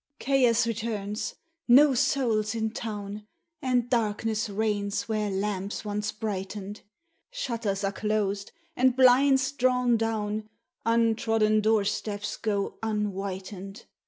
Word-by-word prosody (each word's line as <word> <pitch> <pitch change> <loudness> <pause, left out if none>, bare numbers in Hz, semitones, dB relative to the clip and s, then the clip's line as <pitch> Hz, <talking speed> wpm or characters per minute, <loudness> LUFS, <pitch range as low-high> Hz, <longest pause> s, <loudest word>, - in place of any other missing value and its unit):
Chaos 250 -5 +3
returns! 215 -2 -3 0.3
no 270 +3 +7
soul's 235 -5 +1
in 220 -1 -1
town! 210 -2 -6 0.3
And 250 -2 +1
darkness 225 -2 0
reigns 205 0 -1
where 215 -2 -1
lamps 200 +1 -3
once 210 0 -2
brightened; 205 -1 -5 0.5
Shutters 230 - -3
are 195 - +1
closed, 205 -1 -1 0.2
and 255 0 +3
blinds 265 +1 +5
drawn 250 -3 +2
down 215 -1 -2 0.4
Untrodden 225 -2 +2
door 215 -1 +3
steps 205 0 -3
go 205 -3 -2
unwhitened! 195 -1 -4
215 Hz, 105 wpm, -27 LUFS, 205-235 Hz, 0.5 s, no